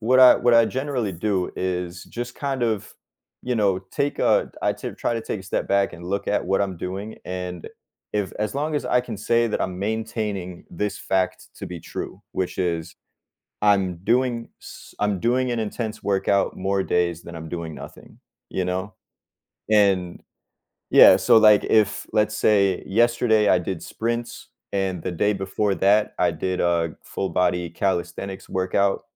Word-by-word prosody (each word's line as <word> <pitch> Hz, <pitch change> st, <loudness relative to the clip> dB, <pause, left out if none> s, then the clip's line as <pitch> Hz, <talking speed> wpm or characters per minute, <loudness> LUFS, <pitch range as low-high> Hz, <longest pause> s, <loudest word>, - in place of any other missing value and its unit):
what 130 Hz, +4 st, +4 dB
I 130 Hz, -1 st, +10 dB
what 120 Hz, -, +2 dB
I 115 Hz, -1 st, +6 dB
generally 130 Hz, -6 st, -2 dB
do 95 Hz, +1 st, -1 dB
is 90 Hz, -1 st, -3 dB
just 120 Hz, 0 st, -6 dB
kind 135 Hz, -3 st, -3 dB
of, 110 Hz, -4 st, -1 dB, 0.5 s
you 125 Hz, -1 st, -1 dB
know, 100 Hz, -4 st, +2 dB
take 145 Hz, 0 st, -1 dB
a -, -, +2 dB
I -, -, +2 dB
ter -, -, -6 dB
try -, -, -1 dB
to 115 Hz, -, -2 dB
take 105 Hz, -, -4 dB
a -, -, -10 dB
step 95 Hz, -, -2 dB
back 100 Hz, 0 st, +2 dB
and 85 Hz, 0 st, -11 dB
look 100 Hz, +3 st, -2 dB
at 105 Hz, -, +1 dB
what 95 Hz, +2 st, +1 dB
I'm 95 Hz, -2 st, -1 dB
doing, 95 Hz, +5 st, -5 dB
and, 90 Hz, -2 st, -5 dB, 0.4 s
if 105 Hz, -2 st, -1 dB
as 105 Hz, +4 st, -2 dB
long 150 Hz, +2 st, -1 dB
as 145 Hz, -, -1 dB
I 125 Hz, -, +3 dB
can 115 Hz, -4 st, -6 dB
say 115 Hz, +2 st, +2 dB
that 110 Hz, -, -2 dB
I'm 90 Hz, -1 st, -2 dB
maintaining 105 Hz, -3 st, -3 dB
this 105 Hz, +4 st, -3 dB
fact 95 Hz, -1 st, -1 dB
to -, -, -7 dB
be 85 Hz, -3 st, -7 dB
true, -, -, -7 dB
which 95 Hz, -, -2 dB
is, 85 Hz, -2 st, -2 dB, 0.7 s
I'm 95 Hz, -4 st, +2 dB
doing 120 Hz, +4 st, 0 dB
s -, -, -12 dB
I'm 105 Hz, -2 st, 0 dB
doing 125 Hz, +4 st, +1 dB
an 120 Hz, -, -1 dB
intense 110 Hz, 0 st, -4 dB
workout 100 Hz, 0 st, +1 dB
more 95 Hz, +1 st, 0 dB
days 85 Hz, -2 st, 0 dB
than 85 Hz, -, -9 dB
I'm 80 Hz, -1 st, -8 dB
doing 85 Hz, -3 st, -5 dB
nothing, -, -, -12 dB, 0.3 s
you 95 Hz, -, -2 dB
know? 95 Hz, +2 st, -3 dB, 0.8 s
And 100 Hz, -5 st, +2 dB, 0.7 s
yeah, -, -, +9 dB
so -, -, +4 dB
like 105 Hz, -1 st, +6 dB
if 105 Hz, -3 st, +2 dB
let's 110 Hz, 0 st, +1 dB
say 100 Hz, -3 st, +3 dB
yesterday 115 Hz, 0 st, +3 dB
I -, -, +5 dB
did 90 Hz, -1 st, -4 dB
sprints 115 Hz, +1 st, -4 dB, 0.2 s
and 95 Hz, -3 st, -1 dB
the 90 Hz, -, -3 dB
day 105 Hz, +5 st, +1 dB
before 100 Hz, +1 st, -1 dB
that 105 Hz, +2 st, +3 dB
I -, -, +3 dB
did 95 Hz, -1 st, -2 dB
a 85 Hz, -2 st, +1 dB
full 95 Hz, -, -3 dB
body 90 Hz, -1 st, 0 dB
calisthenics 95 Hz, +1 st, -3 dB
workout. 95 Hz, +1 st, 0 dB
100 Hz, 175 wpm, -23 LUFS, 90-110 Hz, 0.8 s, I